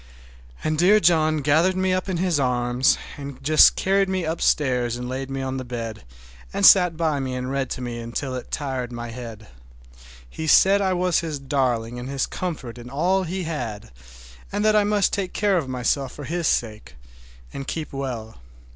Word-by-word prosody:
And 155 0 -1
dear 200 +5 +6
John 155 -3 +3
gathered 160 +6 +3
me 185 0 +1
up 185 +1 -2
in 185 - -1
his 175 -3 +1
arms, 125 0 +2 0.2
and 140 -2 -7
just 155 +2 +6
carried 195 0 +1
me 190 -1 -1
upstairs 130 -7 0
and 125 0 -5
laid 130 +1 -4
me 135 0 -3
on 130 0 -3
the 130 - -4
bed, 115 - -6 0.5
and - - +1
sat 180 -4 +7
by 160 -3 0
me 130 -1 -3
and 125 +1 -4
read 135 -1 -1
to - - -5
me 120 -1 -5
till 135 -2 -2
it 125 - -6
tired 130 -4 -3
my 120 -1 -6
head. 115 -3 -9 0.8
He 160 - -6
said 195 +5 +5
I 190 -1 +1
was 180 -1 +1
his 160 -3 -4
darling 125 -4 -1
and 125 +2 -6
his 135 -1 -1
comfort 140 -10 -5
and 120 +1 -10
all 180 +8 +1
he 185 +2 -3
had, 120 - -5 0.6
and 205 +1 -1
that 215 0 +4
I 210 - +5
must 205 -1 +1
take 190 -2 -2
care 200 -3 +2
of 140 -5 -5
myself 130 +1 -1
for 145 - -9
his 170 +3 -2
sake, 110 -2 -2 0.6
and 135 - -6
keep 160 -3 -5
well. 125 -5 -5
140 Hz, 190 wpm, -23 LUFS, 125-175 Hz, 0.8 s, sat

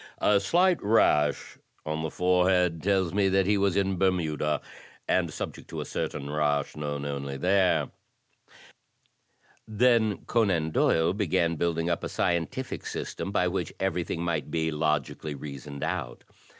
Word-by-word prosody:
A 105 -1 +3
slight 175 - +2
rash 90 -8 +2 0.3
on 75 0 -2
the 80 - -2
forehead 90 -1 +2
tells 95 -2 +1
me 100 -1 +2
that 95 0 +2
he 105 +2 +3
was 100 -2 +1
in 95 -2 0
Bermuda, 80 -5 +1 0.5
and 85 -3 +1
subject - - -6
to - - -5
a - - -4
certain 70 - -4
rash 75 -1 0
known 75 -1 -4
only 70 -1 -4
there." 95 +4 +2 1.8
Then 110 -2 +2
Conan 95 -9 +1
Doyle 80 +2 +2
began 85 -4 +1
building 85 0 -1
up 85 - -1
a - - -1
scientil&c 85 +10 -2
system - - -4
by - - +2
which - - -2
everything 85 -2 -2
might 85 -3 -2
be 80 +1 -1
logically 75 -1 -1
reasoned 70 0 -7
out. - - -4
85 Hz, 140 wpm, -27 LUFS, 75-95 Hz, 1.8 s, A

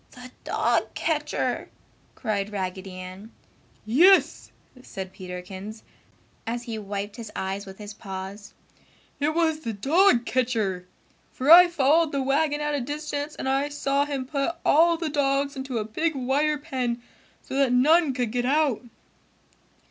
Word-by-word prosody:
"The 250 0 -12
Dog - - 0
Catcher!" - - -1 0.5
cried 210 -4 -2
Raggedy 190 -1 -4
Ann. 185 +4 -9 0.5
"Yes!" 345 - +4 0.3
said 190 -6 -8
Peterkins, 185 +4 -8 0.6
as 240 +1 -3
he 230 -3 -5
wiped 205 +1 -5
his 225 -3 -8
eyes 195 +1 -4
with 190 0 -10
his 210 -1 -8
paws. 195 0 -8 0.6
"It 300 +2 0
was 320 -2 +1
the 230 -8 -4
dog 275 - +3
catcher! 220 -8 -1 0.4
For 270 +4 +1
I 355 +1 +11
followed 320 -1 +2
the 275 -1 0
wagon 295 +2 +1
at 295 0 -1
a 285 - -1
distance 295 +2 -4
and - - -5
I 275 +2 +1
saw 280 -1 0
him 275 -3 -3
put 280 +5 -2
all 335 +3 +5
the 330 -1 -3
dogs 280 -1 0
into 265 -2 -4
a 215 - -2
big 310 +9 -1
wire 280 +4 +1
pen, 260 -5 -3 0.4
so - - -9
that 275 -3 +3
none 290 +3 +4
could 245 -4 -1
get 245 +1 -1
out!" 290 -4 +2
260 Hz, 150 wpm, -25 LUFS, 210-295 Hz, 0.6 s, I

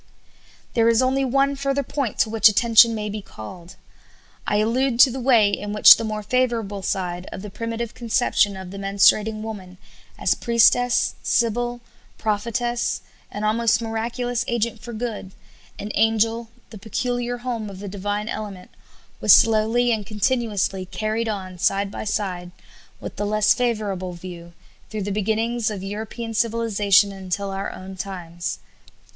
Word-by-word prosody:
There 230 -1 +3
is 230 +2 +3
only 265 +1 +1
one 275 +2 +1
further 275 0 -1
point 275 -3 -3
to 220 - +1
which 225 0 +6
attention 230 +1 +5
may 210 -1 -3
be 210 0 -5
called. 170 - -11 0.7
I 210 - +1
allude 235 +3 +1
to 265 -2 +7
the 265 - -5
way 235 -5 +4
in 205 0 -3
which 210 - +9
the - - -4
more 215 -1 -3
favorable 225 -3 -1
side 180 -2 -3
of 190 - -7
the 210 - -8
primitive 230 +1 -4
conception 230 -4 +1
of 190 -1 -8
the 200 - -7
menstruating 205 +2 +3
woman 190 -5 -8 0.4
as - - +2
priestess, 240 +1 +3
sibyl, 240 +1 0 0.4
prophetess, 235 +3 -1 0.3
an 205 - -6
almost 220 +1 +2
miraculous 235 +2 -2
agent 235 -1 -2
for 235 +2 -8
good, 220 -4 -5 0.4
an 210 - -5
angel, 225 +1 +1 0.2
the 215 - -10
peculiar 245 +3 -2
home 240 -3 -4
of 195 - -9
the 200 +1 -7
divine 205 +2 -3
element 205 -5 -6 0.5
was - - +7
slowly 225 +2 +3
and 215 -3 -2
continuously 215 -4 -1
carried 215 +4 -2
on 185 -4 -5
side 195 +2 +1
by - - -6
side 185 -4 -3 0.5
with - - -8
the 205 - -2
less 215 0 +3
favorable 210 -7 -2
view, 170 -1 -10 0.4
through 215 -2 -4
the 205 - -3
beginnings 220 +3 0
of 200 -3 -6
European 220 +3 -5
civilization 210 -3 +2
until 195 +1 -4
our 195 +1 -4
own 190 +1 -9
times. 175 -3 -5
215 Hz, 150 wpm, -22 LUFS, 200-235 Hz, 0.7 s, which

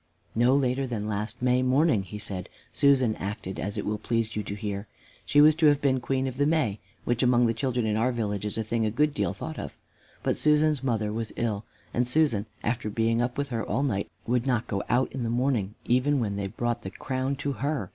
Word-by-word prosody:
"No 120 +4 +4
later 135 -1 +1
than 110 -4 -3
last 110 +3 -3
May 125 0 +3
morning," 130 -2 +3
he 100 +2 -8
said, 100 -4 -6 0.2
"Susan 130 -6 +4
acted 95 -1 -5
as 100 +1 -3
it - - -2
will 105 0 -1
please 115 0 -1
you 105 - 0
to 100 0 -5
hear. 100 -1 -4 0.4
She 145 - +5
was 155 +1 +8
to 160 -2 +5
have 145 -1 +5
been 135 -2 +2
Queen 130 +1 -1
of 130 -1 -4
the 145 +1 +3
May, 150 -11 +1 0.3
which 120 0 +1
among 125 -1 +4
the 115 - +2
children 120 0 -1
in 105 -1 +1
our 115 +4 +2
village 105 -4 -2
is 105 0 -3
a 110 - 0
thing 115 +1 -1
a 110 - +2
good 145 +7 +1
deal - - 0
thought 160 -1 -6
of. - - -7 0.5
But - - +1
Susan's 150 -2 +3
mother 110 -5 0
was 115 -1 -3
ill, 110 -3 -2 0.3
and 125 0 +1
Susan, 125 -7 +2 0.2
after 115 -1 -1
being 115 +2 +1
up 120 +1 -1
with 140 -1 -1
her 115 -3 -2
all 125 +7 -1
night, 100 -8 -1 0.2
would 120 +2 0
not 120 -3 +1
go 100 -1 -2
out 125 +2 +2
in 130 - -4
the 115 - -1
morning, 120 -4 0
even 130 +4 +2
when 105 -4 -1
they 100 -1 -2
brought 120 +3 -2
the 95 - -5
crown 130 +5 -2
to 140 +1 -2
her. 140 -6 -2
120 Hz, 235 wpm, -27 LUFS, 105-135 Hz, 0.5 s, was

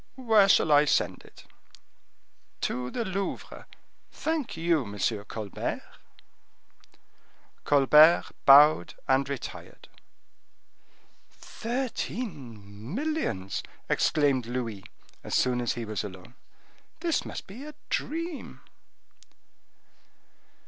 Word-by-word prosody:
"Where 220 -6 +4
shall 160 - +4
I 145 0 +6
send - - 0
it?" - - -16 1.2
"To 125 0 -2
the 230 - -3
Louvre. 195 0 -5 0.4
Thank 315 - -3
you, 165 -1 +2
M. 100 -2 -8 0.3
Colbert." 105 -2 -5 1.8
Colbert 150 +4 +6 0.2
bowed 140 - +7
and 135 +1 +2
retired. 140 -3 -7 1.4
"Thirteen 150 - -6
millions!" 270 - -2 0.3
exclaimed 140 -6 +2
Louis, 115 -5 -4 0.4
as - - -3
soon 125 -1 +2
as 120 - 0
he 120 -1 -5
was 105 -3 -3
alone. 100 +3 -10 0.7
"This 335 -2 0
must - - -7
be 225 +8 -10
a 300 0 -10 0.2
dream!" 330 0 -4
145 Hz, 90 wpm, -27 LUFS, -, 1.8 s, bowed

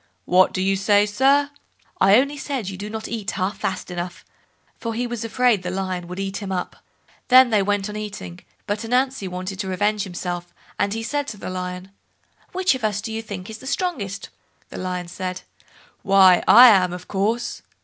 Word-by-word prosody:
"What 185 +1 +4
do 185 - -2
you 195 0 +2
say, 205 +1 +3
sir?" 275 +7 +2 0.5
"I 195 +1 +6
only 280 +3 +1
said 270 -7 -4
you 195 - -6
do 205 +3 -6
not 220 0 -5
eat 220 -2 -4
half 190 +1 -2
fast 185 -1 -3
enough", 175 0 -6 0.5
for 230 -1 -4
he 245 +2 -1
was 240 -2 -4
afraid 230 -2 +2
the 180 - -4
Lion 185 -1 -3
would 180 +2 -7
eat 195 0 -3
him 200 -2 -5
up. 180 -1 -3 0.5
Then 255 -1 +7
they 210 -2 +4
went 205 0 0
on 210 - -7
eating, 210 -4 -7 0.3
but 205 +2 -2
Ananzi 250 -2 0
wanted 185 +1 -5
to 200 - -3
revenge 205 +3 0
himself, 175 -1 -5 0.2
and 200 +1 0
he 225 - -4
said 290 +4 -2
to 215 - -6
the 190 - -6
Lion, 180 +1 -5 0.6
"Which 370 -2 +2
of 260 -3 -6
us 210 -2 0
do 220 +1 -5
you 225 - -3
think 200 -4 -7
is 220 0 -8
the 260 - -10
strongest?" 275 - -3 0.4
The - - -8
Lion 180 -1 -4
said, 180 +1 -5 0.6
"Why, 190 -2 +6
I 245 +2 +10
am, 185 -4 +4
of 180 0 -8
course." 225 +5 -1
205 Hz, 200 wpm, -22 LUFS, 185-230 Hz, 0.6 s, I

